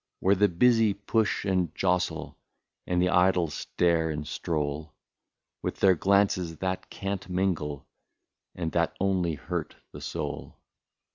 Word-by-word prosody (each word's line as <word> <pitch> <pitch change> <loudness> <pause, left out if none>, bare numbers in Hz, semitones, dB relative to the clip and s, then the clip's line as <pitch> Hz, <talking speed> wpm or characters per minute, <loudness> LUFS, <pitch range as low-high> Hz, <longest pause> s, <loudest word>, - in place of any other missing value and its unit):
Where 95 - +4
the 100 +1 +4
busy 115 +2 +4
push 105 +1 0
and 90 -5 0
jostle, 90 -4 0 0.5
And 90 0 +1
the 90 +1 +3
idle 90 -1 +3
stare 85 -1 +1
and 75 -1 -4
stroll, 75 -1 -3 0.7
With - - -4
their 95 -1 +6
glances 95 -2 +2
that 95 0 -3
can't 95 -1 -4
mingle, 85 -7 -1 0.7
And 85 -2 -3
that 85 -1 0
only 90 -4 +1
hurt - - -4 0.2
the - - -10
soul. - - -5
90 Hz, 130 wpm, -28 LUFS, 80-95 Hz, 0.7 s, their